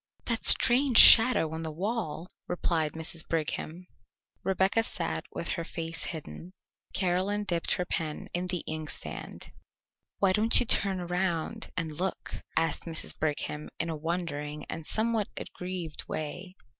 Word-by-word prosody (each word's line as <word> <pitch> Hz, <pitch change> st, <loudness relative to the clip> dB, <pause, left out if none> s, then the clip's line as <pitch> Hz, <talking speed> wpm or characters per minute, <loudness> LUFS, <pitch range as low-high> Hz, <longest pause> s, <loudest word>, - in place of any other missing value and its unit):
"That 230 Hz, -2 st, +2 dB
strange 255 Hz, 0 st, +6 dB
shadow 225 Hz, -9 st, +9 dB
on 160 Hz, -, -5 dB
the 160 Hz, -, -4 dB
wall," 180 Hz, -1 st, -4 dB, 0.2 s
replied 160 Hz, -3 st, -1 dB
Mrs. 160 Hz, 0 st, -2 dB
Brigham. 165 Hz, +2 st, -3 dB, 0.6 s
Rebecca 190 Hz, +3 st, +1 dB
sat 170 Hz, -7 st, -3 dB
with 170 Hz, -, -4 dB
her 170 Hz, -, -2 dB
face 165 Hz, 0 st, -4 dB
hidden: 160 Hz, -, -8 dB, 0.4 s
Caroline 190 Hz, +3 st, 0 dB
dipped 175 Hz, -4 st, 0 dB
her 180 Hz, -, -3 dB
pen 155 Hz, -3 st, -4 dB
in 180 Hz, +1 st, -2 dB
the 180 Hz, -2 st, -3 dB
inkstand. 155 Hz, -1 st, -6 dB, 0.7 s
"Why 195 Hz, -2 st, +2 dB
don't 215 Hz, +4 st, +5 dB
you 245 Hz, -, +2 dB
turn 195 Hz, -4 st, +2 dB
around 180 Hz, +4 st, -2 dB
and 165 Hz, -3 st, -2 dB
look?" 180 Hz, +5 st, -4 dB, 0.2 s
asked 165 Hz, -2 st, 0 dB
Mrs. 165 Hz, -2 st, -1 dB
Brigham 150 Hz, 0 st, -3 dB
in 165 Hz, +1 st, -1 dB
a -, -, -4 dB
wondering 150 Hz, -2 st, -4 dB
and 160 Hz, -1 st, -7 dB
somewhat 220 Hz, -1 st, +1 dB
aggrieved 180 Hz, -4 st, -6 dB
way. 175 Hz, +5 st, -6 dB
175 Hz, 140 wpm, -28 LUFS, 160-190 Hz, 0.7 s, shadow